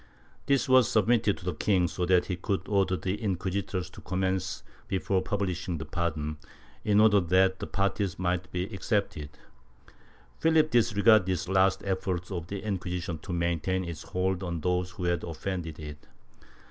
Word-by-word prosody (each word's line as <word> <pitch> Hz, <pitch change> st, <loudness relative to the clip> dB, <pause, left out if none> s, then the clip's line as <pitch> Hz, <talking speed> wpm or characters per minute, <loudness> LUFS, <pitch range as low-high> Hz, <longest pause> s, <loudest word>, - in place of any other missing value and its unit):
This 140 Hz, -3 st, +2 dB
was 130 Hz, -2 st, +5 dB
submitted 110 Hz, -2 st, +3 dB
to 90 Hz, -, -12 dB
the 90 Hz, -, -1 dB
king 90 Hz, +1 st, +2 dB
so 90 Hz, +1 st, -2 dB
that 90 Hz, -1 st, +4 dB
he 90 Hz, -, -2 dB
could 95 Hz, +2 st, -2 dB
order 95 Hz, -2 st, +2 dB
the 95 Hz, +5 st, -3 dB
inquisitors 95 Hz, -2 st, -2 dB
to -, -, -12 dB
commence 95 Hz, +2 st, -2 dB, 0.3 s
l^efore 95 Hz, 0 st, 0 dB
publishing 90 Hz, -3 st, -2 dB
the 80 Hz, -, -6 dB
pardon, 75 Hz, -2 st, -2 dB, 0.5 s
in 105 Hz, -1 st, +3 dB
order 105 Hz, -1 st, +6 dB
that 95 Hz, +1 st, +3 dB
the -, -, -4 dB
parties 100 Hz, -1 st, -1 dB
might 90 Hz, 0 st, -1 dB
be 90 Hz, 0 st, -1 dB
excepted. 100 Hz, -7 st, -1 dB, 1.1 s
Philip 160 Hz, -1 st, +3 dB
disregarded 110 Hz, -3 st, +4 dB
this 90 Hz, -2 st, -1 dB
last 95 Hz, 0 st, +3 dB
effort 95 Hz, -1 st, -2 dB
of 85 Hz, -3 st, -4 dB
the 100 Hz, 0 st, -5 dB
Inquisition 90 Hz, -4 st, -3 dB
to 90 Hz, -, -8 dB
maintain 85 Hz, +2 st, 0 dB
its 85 Hz, -3 st, -6 dB
hold 95 Hz, 0 st, -1 dB
on 85 Hz, -3 st, -3 dB
those 90 Hz, +1 st, 0 dB
who 90 Hz, +1 st, -8 dB
had 85 Hz, 0 st, 0 dB
offended 85 Hz, -1 st, -4 dB
it. 75 Hz, -1 st, -9 dB
95 Hz, 160 wpm, -28 LUFS, 90-100 Hz, 1.1 s, order